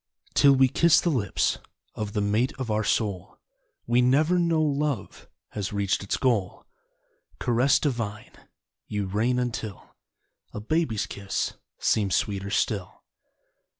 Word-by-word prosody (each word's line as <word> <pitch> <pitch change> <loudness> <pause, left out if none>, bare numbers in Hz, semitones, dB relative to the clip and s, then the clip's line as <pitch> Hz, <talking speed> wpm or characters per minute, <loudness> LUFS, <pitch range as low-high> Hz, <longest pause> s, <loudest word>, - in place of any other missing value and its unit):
Till 140 -1 +6
we 130 0 +5
kiss 170 +5 +4
the 170 - 0
lips 110 -9 0 0.3
Of 105 -1 -5
the 105 - 0
mate 105 +5 +1
of 130 -4 -3
our 105 +1 +1
soul 100 -3 -1 0.5
We 120 +1 +3
never 155 +8 +3
know 170 -2 +2
Love 145 -7 -2 0.2
Has 100 -3 -4
reached 100 -2 0
its 100 - -2
goal. 110 -8 0 0.7
Caress 125 +2 +3
divine, 115 -7 -3 0.6
You 105 -1 -2
reign 110 +6 0
until 115 -5 -4 0.6
A - - -3
baby's 115 -1 0
kiss 100 -1 -3 0.2
seems 100 -4 +1
sweeter 100 -1 -1
still. 100 -2 -2
115 Hz, 130 wpm, -26 LUFS, 100-135 Hz, 0.7 s, Till